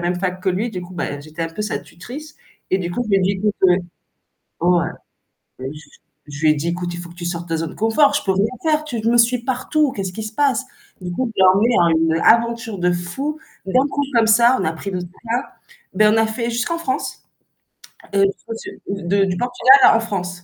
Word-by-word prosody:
même 180 Hz, 0 st, -1 dB
fac 185 Hz, 0 st, -3 dB
que 190 Hz, -, 0 dB
lui, 205 Hz, +6 st, -1 dB
du 180 Hz, -, -5 dB
coup, 180 Hz, +1 st, -10 dB
beh, 145 Hz, -4 st, -4 dB
j'étais 155 Hz, +3 st, -7 dB
un 165 Hz, -, -2 dB
peu 210 Hz, -, -7 dB
sa 210 Hz, -, -2 dB
tutrice 290 Hz, -, -10 dB, 0.4 s
et 190 Hz, -, +2 dB
du 175 Hz, -1 st, -3 dB
coup, 245 Hz, +7 st, -2 dB
je -, -, -8 dB
lui 195 Hz, -, +5 dB
ai -, -, +2 dB
dit: 185 Hz, +1 st, +2 dB
«Écoute» 205 Hz, +2 st, -1 dB
oui, 180 Hz, 0 st, +5 dB, 0.8 s
ouais 175 Hz, 0 st, +3 dB, 0.7 s
je 130 Hz, +1 st, -4 dB, 0.6 s
je 145 Hz, +1 st, -8 dB
lui 155 Hz, -, +5 dB
ai 150 Hz, -, +4 dB
dit: 155 Hz, +3 st, -3 dB
«Écoute, 175 Hz, 0 st, -3 dB
il -, -, -6 dB
faut 175 Hz, -, -9 dB
que -, -, -14 dB
tu 175 Hz, -, -7 dB
sortes 170 Hz, 0 st, -4 dB
de 165 Hz, -, -1 dB
ta -, -, +1 dB
zone 165 Hz, 0 st, -4 dB
confort, 250 Hz, +7 st, +3 dB
je 290 Hz, -, +1 dB
peux 195 Hz, -, 0 dB
rien 195 Hz, +3 st, +2 dB, 0.2 s
faire, 310 Hz, -1 st, +1 dB
tu 245 Hz, -7 st, -4 dB
me 240 Hz, -, +3 dB
suis 240 Hz, +1 st, +4 dB
partout, 265 Hz, +3 st, 0 dB
qu'est-ce 190 Hz, -2 st, -4 dB
qu'il 220 Hz, -, -6 dB
se 215 Hz, -, -6 dB
passe?». 275 Hz, -2 st, +1 dB, 0.4 s
Du 180 Hz, -1 st, -5 dB
coup, 255 Hz, +6 st, -1 dB
je -, -, 0 dB
l'ai 190 Hz, -, +7 dB
emmené 170 Hz, -6 st, +3 dB
à 165 Hz, -, +1 dB
une -, -, -3 dB
aventure 230 Hz, -2 st, +2 dB
de 180 Hz, 0 st, +2 dB
fou, 265 Hz, -, -3 dB, 0.3 s
d'un 255 Hz, +8 st, +3 dB
coup, 285 Hz, +1 st, -1 dB
comme 230 Hz, -2 st, +4 dB
ça, 235 Hz, +3 st, +5 dB
on -, -, -1 dB
a 160 Hz, -, 0 dB
pris 165 Hz, +5 st, -6 dB
notre 180 Hz, -1 st, -3 dB
sac 230 Hz, +7 st, -4 dB, 0.5 s
ben, 215 Hz, 0 st, +4 dB
on -, -, +2 dB
a 225 Hz, -, +3 dB
fait 230 Hz, +2 st, -3 dB
jusqu'en 240 Hz, +9 st, -1 dB
France, 315 Hz, -6 st, -3 dB, 0.9 s
heu, 195 Hz, -, +5 dB
jusqu'au 225 Hz, -, -9 dB
sud -, -, -9 dB
de 195 Hz, 0 st, 0 dB
du 180 Hz, -2 st, -2 dB
Portugal 245 Hz, +3 st, +5 dB
à -, -, +8 dB
la 225 Hz, -, +3 dB
France. 180 Hz, -5 st, -4 dB
200 Hz, 245 wpm, -20 LUFS, 175-240 Hz, 0.9 s, à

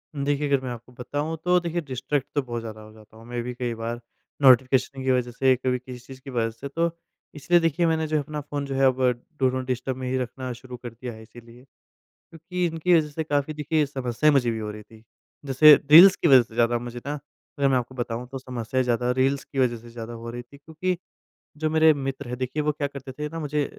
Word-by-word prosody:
देखिए 145 Hz, +1 st, 0 dB
अगर 140 Hz, -2 st, +2 dB
मैं 130 Hz, -, -4 dB
आपको 120 Hz, +1 st, -9 dB
बताऊँ 145 Hz, +6 st, -4 dB
तो 180 Hz, 0 st, +4 dB
देखिए 170 Hz, 0 st, -2 dB
डिस्ट्रैक्ट 135 Hz, 0 st, -3 dB
तो 145 Hz, -, +3 dB
बहुत 120 Hz, -2 st, -5 dB
ज़्यादा 110 Hz, -1 st, -8 dB
हो 110 Hz, 0 st, -13 dB
जाता 110 Hz, 0 st, -18 dB
हूँ। 115 Hz, -, -14 dB
मैं 120 Hz, 0 st, -4 dB
भी 125 Hz, -, -5 dB
कई 120 Hz, -1 st, -3 dB
बार 115 Hz, +1 st, -4 dB, 0.4 s
नोटिफ़िकेशन 130 Hz, +1 st, +4 dB
की 130 Hz, -, +2 dB
वज़ह 125 Hz, -1 st, 0 dB
से 130 Hz, +1 st, +3 dB
कभी 125 Hz, 0 st, -1 dB
किसी 125 Hz, -1 st, -10 dB
चीज़ 130 Hz, -1 st, -11 dB
की 135 Hz, -, -10 dB
वज़ह 115 Hz, -3 st, 0 dB
से 125 Hz, +5 st, -8 dB
तो 165 Hz, +4 st, 0 dB, 0.5 s
इसलिए 175 Hz, +4 st, +3 dB
देखिए 165 Hz, +1 st, +1 dB
मैंने 160 Hz, -1 st, +1 dB
जो 155 Hz, 0 st, +1 dB
अपना 150 Hz, +1 st, -5 dB
फ़ोन 145 Hz, 0 st, -4 dB
जो 135 Hz, -1 st, -4 dB
है 135 Hz, -1 st, +4 dB, 0.5 s
डू 130 Hz, -1 st, +4 dB
नॉट 130 Hz, 0 st, -3 dB
डिस्टर्ब 130 Hz, +1 st, -2 dB
में 130 Hz, -, -5 dB
ही 130 Hz, -, 0 dB
रखना 130 Hz, +1 st, -4 dB
शुरू 125 Hz, +1 st, -10 dB
कर 120 Hz, -, -8 dB
दिया 120 Hz, +1 st, -7 dB
है 110 Hz, -, -12 dB
इसीलिए 120 Hz, +2 st, -15 dB, 0.5 s
क्योंकि 175 Hz, +2 st, -5 dB
इनकी 165 Hz, +1 st, +1 dB
वज़ह 150 Hz, -1 st, 0 dB
से 160 Hz, +2 st, -4 dB
काफ़ी 145 Hz, 0 st, -1 dB
देखिए 150 Hz, 0 st, 0 dB
समस्याएँ 135 Hz, +2 st, +1 dB
मुझे 125 Hz, -4 st, +3 dB
भी 115 Hz, -, -3 dB
हो 105 Hz, -1 st, -4 dB
रही 105 Hz, 0 st, -10 dB
थी। 110 Hz, +1 st, -18 dB, 0.4 s
जैसे 145 Hz, +3 st, +8 dB, 0.2 s
रील्स 185 Hz, +4 st, +10 dB
की -, -, +1 dB
वज़ह 130 Hz, -4 st, +8 dB
से 115 Hz, -, -18 dB
ज़्यादा 120 Hz, 0 st, +3 dB
मुझे 120 Hz, 0 st, -7 dB
ना 145 Hz, -, -2 dB, 0.5 s
अगर 140 Hz, -, +3 dB
मैं 130 Hz, -, +3 dB
आपको 125 Hz, +1 st, -4 dB
बताऊँ 120 Hz, 0 st, -4 dB
तो 135 Hz, -, -4 dB
समस्याएँ 130 Hz, 0 st, -2 dB
ज़्यादा 125 Hz, 0 st, +1 dB
रील्स 135 Hz, +1 st, +1 dB
की 140 Hz, -, -6 dB
वज़ह 120 Hz, -2 st, +2 dB
से 120 Hz, +1 st, -14 dB
ज़्यादा 115 Hz, 0 st, -8 dB
हो 115 Hz, 0 st, -7 dB
रही 120 Hz, 0 st, -6 dB
थी। 120 Hz, +4 st, -17 dB
क्योंकि 165 Hz, +5 st, -3 dB, 0.6 s
जो 155 Hz, +1 st, -1 dB
मेरे 160 Hz, 0 st, +5 dB
मित्र 135 Hz, -3 st, -5 dB
हैं 125 Hz, -, -4 dB
देखिए 130 Hz, +4 st, -2 dB
वो 150 Hz, 0 st, +1 dB
क्या 145 Hz, -1 st, -2 dB
करते 135 Hz, -1 st, -8 dB
थे 150 Hz, +3 st, -5 dB
ना 165 Hz, +2 st, -7 dB
मुझे 150 Hz, -1 st, -1 dB
130 Hz, 240 wpm, -25 LUFS, 120-150 Hz, 0.6 s, रील्स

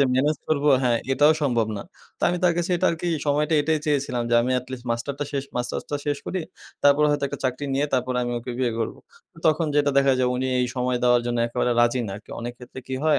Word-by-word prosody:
যে -, -, +6 dB
মেনেজ 150 Hz, +3 st, +2 dB
করব 150 Hz, -2 st, +1 dB, 0.2 s
হ্যাঁ, 120 Hz, -2 st, +2 dB
এটাও 150 Hz, +3 st, +5 dB
সম্ভব 120 Hz, -5 st, +2 dB
না। -, -, -5 dB, 0.4 s
তো -, -, -18 dB
আমি 175 Hz, -, -1 dB
তার 175 Hz, -, +5 dB
কাছে 175 Hz, +2 st, -1 dB
এটা 185 Hz, -, +1 dB
আরকি 165 Hz, +1 st, -4 dB, 0.2 s
সময়টা 150 Hz, +2 st, +2 dB
এটাই 155 Hz, +1 st, +1 dB
চেয়েছিলাম 140 Hz, -4 st, 0 dB
যে, -, -, +3 dB
"আমি 125 Hz, -, -1 dB
এটলিস্ট 125 Hz, 0 st, -8 dB
মাস্টারটা 140 Hz, +5 st, -2 dB
শেষ 140 Hz, -1 st, -2 dB
মাস্টার্সটা 125 Hz, +4 st, -3 dB
শেষ 145 Hz, -1 st, 0 dB
করি। 190 Hz, -, -2 dB, 0.4 s
তারপর 145 Hz, +1 st, +5 dB
হয়তো 145 Hz, -1 st, 0 dB
একটা -, -, -6 dB
চাকরি 130 Hz, +2 st, -1 dB
নিয়ে 145 Hz, +2 st, +1 dB
তারপরে 125 Hz, 0 st, 0 dB
আমি 120 Hz, 0 st, -2 dB
ওকে 120 Hz, +2 st, -7 dB
বিয়ে 125 Hz, -2 st, +1 dB
করবো।" 115 Hz, -, -3 dB, 0.5 s
তখন 160 Hz, +1 st, +3 dB
যেটা 145 Hz, -1 st, +3 dB
দেখা 135 Hz, -1 st, +4 dB
যায় 125 Hz, -1 st, +2 dB
উনি 130 Hz, +1 st, -1 dB
এই 125 Hz, -, +1 dB
সময় 125 Hz, 0 st, 0 dB
দেওয়ার 120 Hz, -1 st, +4 dB
জন্য 120 Hz, -1 st, -1 dB
একেবারে 120 Hz, +1 st, 0 dB
রাজি 120 Hz, +1 st, +3 dB
না। 95 Hz, -, -5 dB
কে -, -, -16 dB
অনেক 120 Hz, +1 st, -4 dB
ক্ষেত্রে 125 Hz, +1 st, -10 dB
কি 130 Hz, -, -4 dB
হয়, 155 Hz, -2 st, +4 dB
130 Hz, 230 wpm, -24 LUFS, 125-145 Hz, 0.5 s, যে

